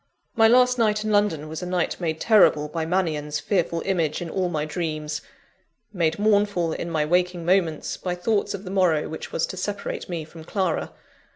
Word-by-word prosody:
My 225 -1 +6
last 250 +1 +4
night 215 -2 +2
in 215 - -1
London 205 -8 +1
was 155 0 -6
a 180 - -4
night 180 -1 -1
made 160 -2 -2
terrible 190 -9 +4
by 160 +1 -3
Mannion's 155 -5 -1
fearful 170 +1 0
image 165 -6 0
in 170 -2 -5
all 185 -2 0
my 155 -3 -2
dreams 155 -1 -3 0.7
made 170 -4 +1
mournful, 205 -5 +2
in 170 - -4
my 155 -2 0
waking 175 +1 +1
moments, 175 -4 +1
by 180 -1 -3
thoughts 200 +3 0
of 195 - -8
the 185 - -7
morrow 180 -6 +2
which 160 - -7
was 165 - 0
to 185 - -8
separate 200 +1 -4
me 170 -3 -3
from 160 +1 -12
Clara. 185 -1 -1
175 Hz, 190 wpm, -24 LUFS, 160-200 Hz, 0.7 s, My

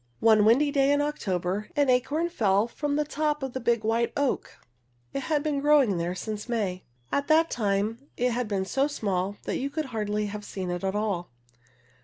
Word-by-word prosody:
One 220 -2 +5
windy 275 +7 +4
day 275 -1 +3
in 285 - +3
October, 200 - -2
an 290 -2 +3
acorn 265 +6 +2
fell 210 - +2
from 285 +4 -2
the 300 0 +1
top 300 -1 -1
of 265 -2 -4
a - - -1
big 235 -2 +1
white 230 +1 +1
oak. 285 -2 -1 0.6
It - - -1
had 295 +1 0
been 300 -2 0
growing 280 -11 +4
there 175 +2 -2
since 210 +4 -5
May. 200 -6 -2 0.3
At 280 0 0
that 320 +1 +4
time 215 +4 -1
it 250 +1 +1
had 240 0 -1
been 195 -2 -1
so 270 +8 +1
small 200 -7 -2
that - - -2
you 275 - -2
could 310 +2 -3
hardly 210 -1 -1
have 210 0 -5
seen 185 -3 -5
it 175 +2 -4
at 190 +1 -1
all. 200 -5 -1
235 Hz, 200 wpm, -27 LUFS, 205-285 Hz, 0.6 s, One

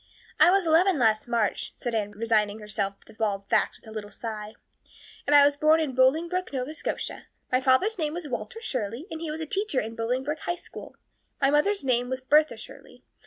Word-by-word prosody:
"I - - +7
was 390 0 +3
eleven 335 +2 +4
last 220 -2 +2
March," 230 -4 -1
said 240 - -4
Anne, 210 -2 -1
resigning 215 -1 +1
herself 205 -2 -3
to - - -16
bald 200 -3 -2
facts - - +2
with - - -20
a - - -9
little 215 -1 -6
sigh. 215 0 -7 0.7
"And 290 - +5
I 285 -1 +8
was 285 0 +3
born 310 +2 +4
in 305 -5 -1
Bolingbroke, 325 +8 +2
Nova 265 +2 -3
Scotia. 315 - -4 0.2
My 255 0 +3
father's 275 +12 +2
name 305 -1 -1
was 345 -3 -5
Walter 290 - -5
Shirley, 240 - -3
and 320 0 -5
he 330 - -4
was 310 +1 -4
a - - -2
teacher 390 -3 -1
in 220 - -4
the 230 - -13
Bolingbroke 260 +6 -2
High 350 - -2
School. - - -11 0.4
My 275 -1 +3
mother's 345 +6 +2
name 245 -2 +1
was 260 0 -2
Bertha 300 +4 +3
Shirley. - - -12
260 Hz, 210 wpm, -26 LUFS, 225-315 Hz, 0.7 s, I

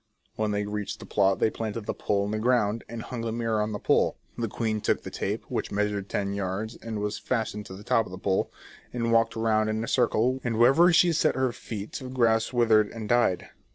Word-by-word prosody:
When 110 0 -1
they 105 0 -1
reached 105 -1 -4
the - - -9
plot 95 -2 +2
they 110 - +2
planted 110 -1 -4
the - - -2
pole 100 -1 0
in 105 - -3
the 110 - -1
ground, 115 -2 +1
and 115 -1 -6
hung 125 -2 -5
the 115 -1 -2
mirror 115 -2 0
on 105 +1 -1
the 105 - -3
pole. - - +2 0.2
The 115 - -2
queen 110 0 -2
took - - 0
the - - -7
tape, - - -3
which - - -3
measured 105 -1 -1
ten 100 -1 -1
yards 100 +3 -3
and 115 -2 -6
was 105 0 -2
fastened 110 -4 -2
to 95 - -8
the 100 - -11
top 110 +1 +2
of - - -12
the 95 - -7
pole, 95 0 0 0.4
and 115 -1 -1
walked 115 0 +3
round 110 -1 +1
in 110 +1 -1
a - - -4
circle, 125 +1 +2
and 115 -2 -1
wherever 135 +10 +6
she 170 0 +5
set 155 - +2
her 130 -1 +1
feet 110 -3 -7
the 130 - -6
grass 115 -3 +2
withered 110 -4 +4
and 110 -2 -7
died. 120 -7 +2
110 Hz, 235 wpm, -27 LUFS, 105-115 Hz, 0.4 s, wherever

